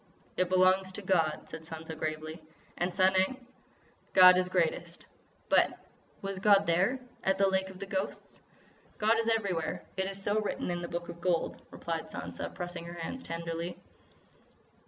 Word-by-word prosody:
"It 185 Hz, -1 st, +1 dB
belongs 185 Hz, +1 st, +4 dB
to 205 Hz, -, -6 dB
God," 165 Hz, -5 st, +1 dB
said 160 Hz, -, -8 dB
Sansa 160 Hz, 0 st, -7 dB
gravely. 155 Hz, +1 st, -4 dB, 0.3 s
"And—Sanang?" 190 Hz, +7 st, +2 dB, 0.7 s
"God 185 Hz, -1 st, +9 dB
is 180 Hz, 0 st, +1 dB
greatest." 170 Hz, -1 st, -1 dB, 0.4 s
"But—was 195 Hz, -1 st, -1 dB
God 200 Hz, 0 st, +5 dB
there—at 195 Hz, +3 st, 0 dB
the 195 Hz, -, +4 dB
Lake 190 Hz, 0 st, +1 dB
of 190 Hz, -, -11 dB
the 200 Hz, -, -6 dB
Ghosts?" 195 Hz, 0 st, -4 dB, 0.6 s
"God 220 Hz, +2 st, +3 dB
is 230 Hz, 0 st, +1 dB
everywhere. 195 Hz, -8 st, -1 dB
It 190 Hz, -, +1 dB
is 195 Hz, 0 st, -5 dB
so 205 Hz, +2 st, +1 dB
written 205 Hz, -, -2 dB
in 175 Hz, 0 st, -2 dB
the 170 Hz, -, -4 dB
Book 170 Hz, 0 st, -4 dB
of 170 Hz, 0 st, -9 dB
Gold," 175 Hz, -2 st, 0 dB
replied -, -, -4 dB
Sansa, -, -, -6 dB
pressing 175 Hz, -1 st, -6 dB
her 170 Hz, 0 st, -8 dB
hands 170 Hz, +10 st, -5 dB
tenderly. 165 Hz, 0 st, -4 dB
185 Hz, 150 wpm, -30 LUFS, 170-195 Hz, 0.7 s, God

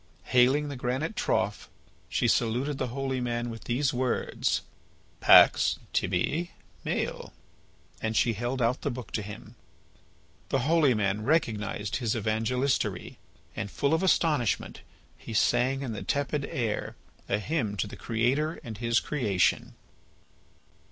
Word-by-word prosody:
Hailing 130 Hz, +4 st, +3 dB
the 140 Hz, -, -5 dB
granite 130 Hz, -, -2 dB
trough, 100 Hz, +2 st, -1 dB, 0.4 s
she -, -, +1 dB
saluted 125 Hz, +5 st, +1 dB
the -, -, -1 dB
holy 130 Hz, +1 st, -2 dB
man 120 Hz, -1 st, -2 dB
with 115 Hz, -, -9 dB
these 130 Hz, +3 st, 0 dB
words: 125 Hz, 0 st, 0 dB, 0.6 s
"Pax -, -, +6 dB, 0.2 s
tibi 125 Hz, -, 0 dB, 0.3 s
Maël." -, -, -3 dB, 0.7 s
And 110 Hz, -1 st, -1 dB
she 115 Hz, -, +3 dB
held 120 Hz, +4 st, -2 dB
out 120 Hz, +3 st, +1 dB
the -, -, -1 dB
book 125 Hz, -4 st, -7 dB
to 110 Hz, -, -2 dB
him. 105 Hz, 0 st, -9 dB, 1.0 s
The 135 Hz, -, +1 dB
holy 155 Hz, -5 st, +4 dB
man 105 Hz, 0 st, 0 dB
recognised 105 Hz, -7 st, 0 dB
his 115 Hz, -4 st, -1 dB
evangelistary, 115 Hz, +5 st, -1 dB, 0.4 s
and, 100 Hz, -, -4 dB
full 140 Hz, +9 st, 0 dB
of 160 Hz, -, +2 dB
astonishment, 155 Hz, -, +1 dB, 0.4 s
he 110 Hz, -, -7 dB
sang 130 Hz, +5 st, +2 dB
in 125 Hz, -, -3 dB
the 105 Hz, -, -5 dB
tepid 145 Hz, 0 st, -1 dB
air 115 Hz, -4 st, -3 dB, 0.3 s
a 100 Hz, -, +2 dB
hymn 110 Hz, -3 st, -2 dB
to -, -, 0 dB
the 100 Hz, -, -9 dB
Creator 130 Hz, +8 st, 0 dB
and 110 Hz, -3 st, -7 dB
His 115 Hz, 0 st, +2 dB
creation. 105 Hz, -11 st, 0 dB
120 Hz, 135 wpm, -28 LUFS, 110-140 Hz, 1.0 s, Pax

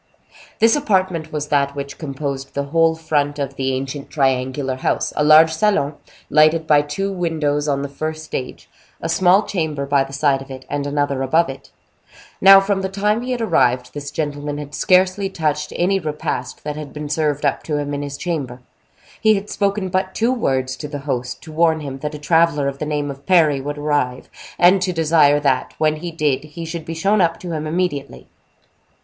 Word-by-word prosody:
This 225 Hz, +3 st, +4 dB
apartment 185 Hz, -, 0 dB
was 150 Hz, -1 st, -4 dB
that 140 Hz, -1 st, +1 dB
which 140 Hz, 0 st, -6 dB
composed 140 Hz, -2 st, -5 dB
the 140 Hz, -, 0 dB
whole 165 Hz, +3 st, +2 dB
front 150 Hz, -3 st, -1 dB
of 140 Hz, -2 st, -3 dB
the 135 Hz, 0 st, -1 dB
ancient 135 Hz, +2 st, -5 dB
triangular 130 Hz, -1 st, 0 dB
house; -, -, -1 dB
a 150 Hz, -, +1 dB
large 155 Hz, +2 st, +7 dB
salon, 175 Hz, -5 st, +1 dB, 0.3 s
lighted 155 Hz, +2 st, +4 dB
by 150 Hz, -2 st, +5 dB
two 170 Hz, +7 st, -3 dB
windows 155 Hz, -5 st, -1 dB
on 140 Hz, -1 st, 0 dB
the -, -, -3 dB
first 155 Hz, +3 st, -5 dB
stage, 130 Hz, -4 st, -6 dB, 0.3 s
a -, -, -4 dB
small 180 Hz, +4 st, +4 dB
chamber 155 Hz, -8 st, -2 dB
by 140 Hz, -1 st, +2 dB
the 135 Hz, -, -10 dB
side 140 Hz, -1 st, +1 dB
of 135 Hz, -, -11 dB
it, 130 Hz, -1 st, -9 dB
and 145 Hz, 0 st, -2 dB
another 145 Hz, -2 st, -1 dB
above 160 Hz, +4 st, +2 dB
it. 135 Hz, -, -9 dB, 0.7 s
Now, 195 Hz, 0 st, +9 dB
from 195 Hz, 0 st, 0 dB
the 190 Hz, -, -2 dB
time 210 Hz, +3 st, 0 dB
he 255 Hz, +1 st, -4 dB
had 245 Hz, -2 st, -2 dB
arrived, 125 Hz, -, +1 dB
this 145 Hz, -1 st, -6 dB
gentleman 145 Hz, -1 st, -3 dB
had 145 Hz, 0 st, -8 dB
scarcely 185 Hz, +3 st, +2 dB
touched 150 Hz, -4 st, -2 dB
any 195 Hz, +3 st, +1 dB
repast 150 Hz, -6 st, -4 dB
that 150 Hz, 0 st, -4 dB
had 150 Hz, -1 st, -8 dB
been 150 Hz, 0 st, -6 dB
served 150 Hz, -1 st, -1 dB
up 140 Hz, -, +1 dB
to 150 Hz, -2 st, -1 dB
him 145 Hz, 0 st, -3 dB
in 145 Hz, -, -3 dB
his 140 Hz, -1 st, -5 dB
chamber. 140 Hz, -8 st, -4 dB, 0.6 s
He 220 Hz, -1 st, +5 dB
had 200 Hz, +1 st, -5 dB
spoken 200 Hz, -1 st, -1 dB
but 190 Hz, +1 st, -1 dB
two 235 Hz, +3 st, +2 dB
words 130 Hz, -, -1 dB
to 150 Hz, -, -6 dB
the 145 Hz, -1 st, -6 dB
host, 125 Hz, -3 st, -3 dB
to 160 Hz, -, -10 dB
warn 160 Hz, 0 st, +2 dB
him 135 Hz, -2 st, -6 dB
that 150 Hz, +2 st, -4 dB
a -, -, -5 dB
traveler 155 Hz, -1 st, +2 dB
of 140 Hz, 0 st, -4 dB
the 150 Hz, -, -3 dB
name 145 Hz, -1 st, -2 dB
of 140 Hz, +1 st, -13 dB
Parry 155 Hz, -7 st, +4 dB
would 145 Hz, +2 st, -5 dB
arrive, 145 Hz, -4 st, -1 dB, 0.3 s
and 185 Hz, +2 st, +5 dB
to 180 Hz, 0 st, 0 dB
desire 155 Hz, -3 st, +4 dB
that, 130 Hz, -3 st, 0 dB
when 155 Hz, 0 st, +1 dB
he 175 Hz, +3 st, -5 dB
did, 150 Hz, -5 st, 0 dB
he 160 Hz, +2 st, -8 dB
should 165 Hz, 0 st, -6 dB
be 165 Hz, -, -5 dB
shown 195 Hz, +5 st, +2 dB
up 165 Hz, -1 st, +1 dB
to 175 Hz, -, -6 dB
him 155 Hz, -1 st, -3 dB
immediately. 155 Hz, -4 st, -3 dB
150 Hz, 205 wpm, -20 LUFS, 140-170 Hz, 0.7 s, Now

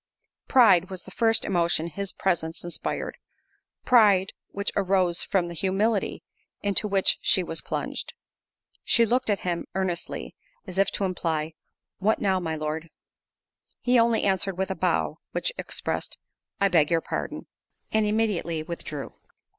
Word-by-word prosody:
Pride, 195 Hz, -9 st, +6 dB
was 185 Hz, -2 st, -7 dB
the 190 Hz, -, -12 dB
first 225 Hz, +2 st, +2 dB
emotion 170 Hz, -3 st, +1 dB
his 195 Hz, +4 st, -3 dB
presence 165 Hz, -4 st, -1 dB
inspired—pride, 195 Hz, +3 st, 0 dB, 0.2 s
which 200 Hz, 0 st, -3 dB
arose 185 Hz, -3 st, +2 dB
from 190 Hz, -3 st, +1 dB
the 170 Hz, -, -6 dB
humility 195 Hz, +4 st, 0 dB, 0.4 s
into 205 Hz, +1 st, +1 dB
which 195 Hz, -2 st, +2 dB
she 185 Hz, -, +3 dB
was 165 Hz, -1 st, -4 dB
plunged. -, -, -4 dB, 0.7 s
She 235 Hz, -, +4 dB
looked 250 Hz, +1 st, +1 dB
at 205 Hz, -, +1 dB
him 175 Hz, -2 st, -2 dB
earnestly, 185 Hz, -3 st, -3 dB, 0.3 s
as 190 Hz, -1 st, -4 dB
if 195 Hz, -, +4 dB
to -, -, 0 dB
imply, 160 Hz, -4 st, -2 dB, 0.5 s
"What 215 Hz, +3 st, +2 dB
now, 190 Hz, -2 st, +1 dB
my 160 Hz, -3 st, -2 dB
Lord?" 155 Hz, +1 st, -4 dB, 0.9 s
He 250 Hz, 0 st, +3 dB
only 230 Hz, -1 st, +3 dB
answered 190 Hz, -1 st, +1 dB
with 190 Hz, 0 st, -1 dB
a -, -, -2 dB
bow, -, -, 0 dB
which -, -, 0 dB
expressed; -, -, -3 dB, 0.4 s
"I 200 Hz, -, +4 dB
beg 165 Hz, -6 st, +3 dB
your 165 Hz, -1 st, +2 dB
pardon." -, -, -4 dB, 0.5 s
And 220 Hz, 0 st, +3 dB
immediately 210 Hz, -7 st, 0 dB
withdrew. 155 Hz, -4 st, -6 dB
190 Hz, 140 wpm, -26 LUFS, 170-205 Hz, 0.9 s, Pride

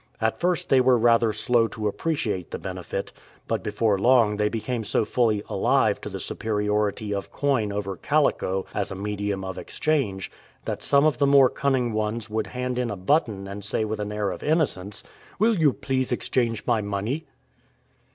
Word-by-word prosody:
At 110 Hz, 0 st, 0 dB
first 175 Hz, -2 st, 0 dB
they 130 Hz, -1 st, +5 dB
were 125 Hz, -1 st, +4 dB
rather 115 Hz, -1 st, +4 dB
slow 115 Hz, +2 st, +2 dB
to 110 Hz, 0 st, -3 dB
appreciate 105 Hz, -, -2 dB
the -, -, -4 dB
benefit, -, -, -5 dB, 0.4 s
but -, -, -1 dB
before 105 Hz, -4 st, 0 dB
long 115 Hz, -2 st, +4 dB
they 105 Hz, 0 st, +2 dB
became 115 Hz, +1 st, -3 dB
so 110 Hz, +1 st, 0 dB
fully 110 Hz, -4 st, +1 dB
alive -, -, +2 dB
to -, -, -6 dB
the -, -, -6 dB
superiority 105 Hz, 0 st, -1 dB
of 100 Hz, -, -4 dB
coin 130 Hz, -8 st, 0 dB
over 100 Hz, -1 st, -3 dB
calico 95 Hz, -, +1 dB
as 100 Hz, -, -1 dB
a 95 Hz, -, -5 dB
medium 100 Hz, 0 st, -3 dB
of 95 Hz, -1 st, -5 dB
exchange 130 Hz, -12 st, -1 dB, 0.3 s
that -, -, -3 dB
some 140 Hz, +1 st, +4 dB
of 150 Hz, -6 st, +2 dB
the 140 Hz, -, +4 dB
more 140 Hz, -2 st, +6 dB
cunning 130 Hz, -4 st, 0 dB
ones 110 Hz, 0 st, -2 dB
would 110 Hz, 0 st, -1 dB
hand 125 Hz, 0 st, -3 dB
in 125 Hz, -2 st, -1 dB
a 105 Hz, -, -4 dB
button 100 Hz, -, 0 dB
and 100 Hz, +1 st, -7 dB
say 105 Hz, +2 st, +1 dB
with 110 Hz, 0 st, -3 dB
an 105 Hz, 0 st, -3 dB
air 105 Hz, -2 st, -1 dB
of -, -, -7 dB
innocence, 140 Hz, -, 0 dB, 0.2 s
" -, -, -24 dB
Will 225 Hz, +2 st, +3 dB
you 155 Hz, -6 st, +4 dB
please 130 Hz, -1 st, -2 dB
exchange 120 Hz, -2 st, -1 dB
my 115 Hz, -3 st, +2 dB
money 105 Hz, +10 st, -3 dB
110 Hz, 185 wpm, -25 LUFS, 105-130 Hz, 0.4 s, more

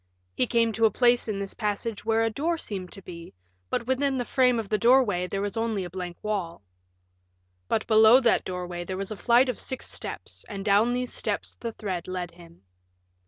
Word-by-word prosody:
He 250 Hz, -, +1 dB
came 230 Hz, -1 st, +2 dB
to 225 Hz, +1 st, +3 dB
a -, -, +1 dB
place 245 Hz, +1 st, +3 dB
in 210 Hz, -2 st, -2 dB
this 195 Hz, 0 st, -4 dB
passage 210 Hz, 0 st, -3 dB
where 225 Hz, +1 st, +2 dB
a 225 Hz, -, +1 dB
door 330 Hz, +8 st, -1 dB
seemed 190 Hz, -, -6 dB
to 195 Hz, -, -7 dB
be, 170 Hz, -, -10 dB, 0.3 s
but 235 Hz, -, -1 dB
within 265 Hz, +2 st, +1 dB
the 245 Hz, -, -1 dB
frame 250 Hz, -1 st, +3 dB
of 225 Hz, -3 st, -3 dB
the 215 Hz, +1 st, 0 dB
doorway 230 Hz, -7 st, +4 dB
there 195 Hz, +2 st, -3 dB
was 205 Hz, +1 st, -3 dB
only 225 Hz, -3 st, -1 dB
a 175 Hz, -, -7 dB
blank 180 Hz, -2 st, -6 dB
wall. 190 Hz, -, -3 dB, 1.0 s
But 220 Hz, -, 0 dB
below 220 Hz, +2 st, +7 dB
that 235 Hz, -3 st, +3 dB
doorway 180 Hz, -1 st, -5 dB
there 185 Hz, +1 st, -5 dB
was 195 Hz, +2 st, -5 dB
a -, -, -3 dB
flight 240 Hz, +7 st, +4 dB
of 250 Hz, -, -2 dB
six 260 Hz, -, -5 dB
steps, -, -, -7 dB
and 200 Hz, -2 st, -6 dB
down 215 Hz, +4 st, +4 dB
these 250 Hz, 0 st, -2 dB
steps -, -, -2 dB
the 230 Hz, -, -6 dB
thread 190 Hz, -6 st, -5 dB
led 180 Hz, -2 st, -4 dB
him. 170 Hz, -, -17 dB
215 Hz, 210 wpm, -26 LUFS, 185-240 Hz, 1.0 s, below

